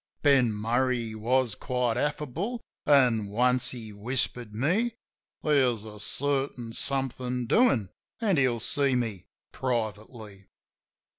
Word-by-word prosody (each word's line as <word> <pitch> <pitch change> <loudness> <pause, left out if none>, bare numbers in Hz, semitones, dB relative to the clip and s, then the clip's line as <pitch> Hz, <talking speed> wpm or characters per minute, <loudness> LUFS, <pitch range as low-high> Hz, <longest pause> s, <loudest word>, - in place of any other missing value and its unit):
Ben 135 -5 +5
Murray 115 +2 0
was 120 +2 +1
quite 125 +1 -1
affable, 150 - -2 0.3
an' 125 -7 +4
once 125 +4 +2
he 110 -4 -7
whispered 120 +1 -3
me 200 - +1 0.5
There's 130 -7 +2
a 105 -1 -10
certain 135 -2 -1
somethin' 125 -2 -1
doin', 120 - +3 0.3
an' 205 -7 +2
he'll 130 -4 +2
see 135 +3 +1
me 110 -7 -3 0.2
privately. 110 -4 -4
125 Hz, 105 wpm, -28 LUFS, 110-140 Hz, 0.5 s, Ben